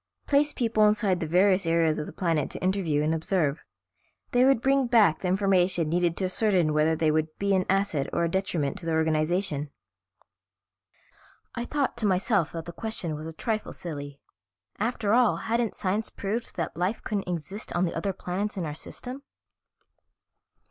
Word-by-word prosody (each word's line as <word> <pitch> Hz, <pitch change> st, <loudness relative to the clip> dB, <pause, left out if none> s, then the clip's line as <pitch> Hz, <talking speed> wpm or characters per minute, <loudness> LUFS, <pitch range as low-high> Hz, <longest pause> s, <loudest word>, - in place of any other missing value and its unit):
Place 290 Hz, +1 st, +3 dB
people 225 Hz, -5 st, +2 dB
inside 205 Hz, -4 st, +2 dB
the 160 Hz, -, -3 dB
various 185 Hz, +2 st, +3 dB
areas 165 Hz, -2 st, +2 dB
of 150 Hz, -, -4 dB
the -, -, -7 dB
planet 165 Hz, -4 st, 0 dB
to -, -, -6 dB
interview 180 Hz, -6 st, +1 dB
and 155 Hz, +1 st, +1 dB
observe. 160 Hz, -2 st, 0 dB, 0.7 s
They 245 Hz, 0 st, +4 dB
would 270 Hz, -3 st, +4 dB
bring 270 Hz, +1 st, +2 dB
back 220 Hz, -9 st, +4 dB
the 185 Hz, -, -3 dB
information 185 Hz, -3 st, +2 dB
needed 170 Hz, 0 st, +1 dB
to 190 Hz, -, 0 dB
ascertain 185 Hz, -5 st, +2 dB
whether 155 Hz, +1 st, +3 dB
they 155 Hz, -1 st, +2 dB
would 155 Hz, 0 st, +1 dB
be 200 Hz, 0 st, +1 dB
an 185 Hz, -1 st, +1 dB
asset 195 Hz, -8 st, +1 dB
or -, -, 0 dB
a -, -, +2 dB
detriment 170 Hz, -5 st, -1 dB
to 165 Hz, -, -8 dB
the 165 Hz, -, 0 dB
organization." 160 Hz, -1 st, 0 dB, 1.8 s
I 235 Hz, -, -4 dB
thought 285 Hz, -2 st, -1 dB
to 220 Hz, -3 st, +1 dB
myself 190 Hz, -2 st, +1 dB
that 165 Hz, -1 st, -5 dB
the 170 Hz, -, -8 dB
question 200 Hz, -5 st, -3 dB
was 155 Hz, +1 st, -6 dB
a -, -, -5 dB
trifle 215 Hz, +6 st, -3 dB
silly; 145 Hz, -4 st, -7 dB, 0.6 s
after 220 Hz, -1 st, 0 dB
all, 245 Hz, -2 st, +4 dB
hadn't 230 Hz, -1 st, -1 dB
science 205 Hz, +4 st, -1 dB
proved 215 Hz, +4 st, -4 dB
that 165 Hz, -, -3 dB
life 180 Hz, +6 st, -2 dB
couldn't 200 Hz, -4 st, -3 dB
exist 175 Hz, +4 st, -5 dB
on 175 Hz, +1 st, +2 dB
the 170 Hz, -, -3 dB
other 200 Hz, -, -1 dB
planets 195 Hz, +3 st, -4 dB
in 180 Hz, -, -2 dB
our 150 Hz, -, -4 dB
system? 250 Hz, -, -7 dB
185 Hz, 175 wpm, -27 LUFS, 160-210 Hz, 1.8 s, They